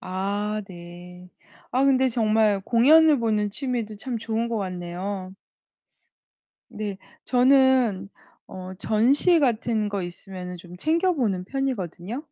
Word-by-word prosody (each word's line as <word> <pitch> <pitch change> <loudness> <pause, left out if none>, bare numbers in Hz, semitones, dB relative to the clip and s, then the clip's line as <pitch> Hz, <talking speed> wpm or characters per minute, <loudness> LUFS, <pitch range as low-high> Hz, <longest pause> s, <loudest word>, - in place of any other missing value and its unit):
아. 205 +3 -3
네. 180 0 -12 0.4
아 260 +2 +1
근데 265 -1 +3
정말 215 -3 +2
공연을 290 +8 +5
보는 215 -2 0
취미도 235 -2 -4
참 235 +3 -4
좋은 225 +1 -2
것 230 - -2
같네요. 185 0 -5 1.4
네. 205 -2 -5 0.3
저는 255 -6 +3 0.4
어 185 0 -9
전시 270 - +3
같은 230 -4 0
거 200 -2 -3
있으면은 180 +1 -8
좀 175 0 -12
챙겨보는 300 - 0
편이거든요. 235 - -4
215 Hz, 220 characters per minute, -24 LUFS, 185-255 Hz, 1.4 s, 공연을